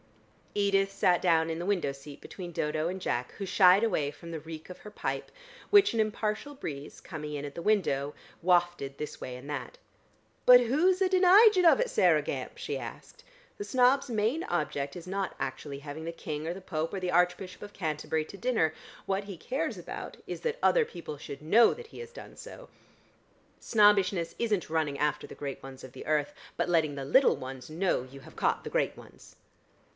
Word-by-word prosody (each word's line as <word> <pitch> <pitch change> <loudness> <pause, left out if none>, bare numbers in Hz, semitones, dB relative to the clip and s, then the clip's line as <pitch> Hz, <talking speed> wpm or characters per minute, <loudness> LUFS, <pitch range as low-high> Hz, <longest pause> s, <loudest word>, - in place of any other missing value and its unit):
Edith 195 -1 +2
sat 180 -2 +2
down 165 -2 +3
in 165 0 -3
the 175 - -4
window 190 -8 0
seat 140 +1 -11
between 180 -3 -8
Dodo 155 0 -1
and 190 +1 -4
Jack, 125 -8 -2
who 200 - -5
shied 190 +2 +5
away 155 -10 0
from 170 +3 -11
the 165 - -4
reek 160 +1 -9
of 180 - -9
her 210 - -11
pipe, - - -4 0.4
which 405 -8 +6
an 230 - -1
impartial 215 +6 -2
breeze, 145 - -7
coming 150 -3 -6
in 145 0 -4
at 140 - -7
the 170 - -5
window, 155 -9 +1 0.3
wafted 175 -6 +1
this 150 - -6
way 125 -1 -6
and 135 +3 -11
that. 150 - -5 0.7
"But 250 0 +10
who's 330 +11 +2
a 380 - +5
deniging 375 +1 +6
of 330 - +7
it, - - +1
Saireh - - +4
Gamp?" - - -5
she - - -3
asked. - - -9 0.3
"The 410 - -4
snob's 260 -3 +3
main 230 +8 0
object 145 -4 -2
is 175 +1 -10
not 195 +1 -3
actually 140 -2 -4
having 145 +2 -7
the 165 - -4
King 155 -2 -5
or 170 - -1
the 190 - -9
Pope 165 -3 -3
or 195 - -2
the 180 -1 -2
Archbishop 180 +2 +1
of 205 - -8
Canterbury 155 -3 -2
to 200 - -11
dinner; 220 -10 +1 0.3
what 195 +1 -1
he 195 -3 -8
cares 280 - -3
about - - -7
is - - -5
that 475 0 -2
other - - +5
people 170 - -8
should 140 0 -9
know 225 +9 +6
that 475 -1 -10
he - - -12
has 470 0 -8
done - - -11
so. - - -11 0.9
Snobbishness 200 -5 +3
isn't 215 -8 0
running 155 -3 0
after 150 0 -1
the - - -10
great 140 -2 -6
ones 135 -1 -10
of 130 -1 -11
the - - -10
earth, 150 -1 +1 0.2
but - - 0
letting 160 -4 +2
the 135 -1 -5
little 265 - +4
ones 130 +1 -8
know 165 -4 0
you 135 +1 -12
have - - -15
caught - - 0
the - - -4
great - - 0
ones." - - -15
175 Hz, 200 wpm, -29 LUFS, 150-215 Hz, 0.9 s, But